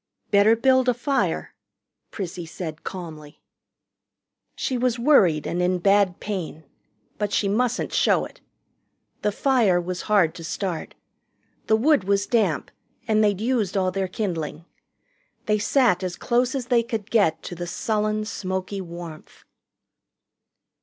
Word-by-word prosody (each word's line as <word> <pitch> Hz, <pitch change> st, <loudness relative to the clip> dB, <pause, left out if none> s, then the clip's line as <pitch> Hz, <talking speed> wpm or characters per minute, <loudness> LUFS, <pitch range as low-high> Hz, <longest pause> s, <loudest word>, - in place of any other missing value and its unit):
"Better 205 Hz, +2 st, +5 dB
build 260 Hz, +2 st, +3 dB
a 245 Hz, -, +2 dB
fire," 270 Hz, +3 st, -1 dB, 0.6 s
Prissy 175 Hz, -4 st, -6 dB
said 160 Hz, -2 st, -7 dB
calmly. 155 Hz, -5 st, -8 dB, 1.2 s
She 260 Hz, -, -2 dB
was 250 Hz, -1 st, +1 dB
worried 200 Hz, -, +4 dB
and 175 Hz, -, -1 dB
in 180 Hz, +1 st, +2 dB
bad 195 Hz, 0 st, +3 dB
pain. 180 Hz, -6 st, -5 dB, 0.6 s
But 205 Hz, -1 st, -1 dB
she 200 Hz, -, +1 dB
mustn't 240 Hz, +4 st, 0 dB
show -, -, +3 dB
it. -, -, -14 dB, 0.8 s
The 210 Hz, -, +1 dB
fire 225 Hz, -6 st, +2 dB
was 180 Hz, +1 st, -4 dB
hard 195 Hz, -7 st, +4 dB
to 170 Hz, -, -10 dB
start. 170 Hz, 0 st, -4 dB, 0.7 s
The 220 Hz, -, +4 dB
wood 270 Hz, -3 st, +3 dB
was 200 Hz, 0 st, +1 dB
damp, 200 Hz, -, 0 dB, 0.4 s
and 215 Hz, -1 st, +3 dB
they'd 205 Hz, -2 st, +2 dB
used 220 Hz, -5 st, 0 dB
all 185 Hz, -1 st, +1 dB
their 190 Hz, 0 st, -1 dB
kindling. 170 Hz, -5 st, -4 dB, 0.8 s
They 210 Hz, 0 st, +1 dB
sat 225 Hz, -5 st, +3 dB
as 180 Hz, -2 st, -3 dB
close 245 Hz, +4 st, 0 dB
as 260 Hz, -3 st, -2 dB
they 240 Hz, -1 st, +3 dB
could 225 Hz, -3 st, -5 dB
get 200 Hz, -8 st, +2 dB
to -, -, -6 dB
the 175 Hz, 0 st, -5 dB
sullen, 215 Hz, +3 st, -1 dB
smoky 190 Hz, -1 st, -4 dB
warmth. 170 Hz, -3 st, -10 dB
200 Hz, 140 wpm, -24 LUFS, 175-230 Hz, 1.2 s, Better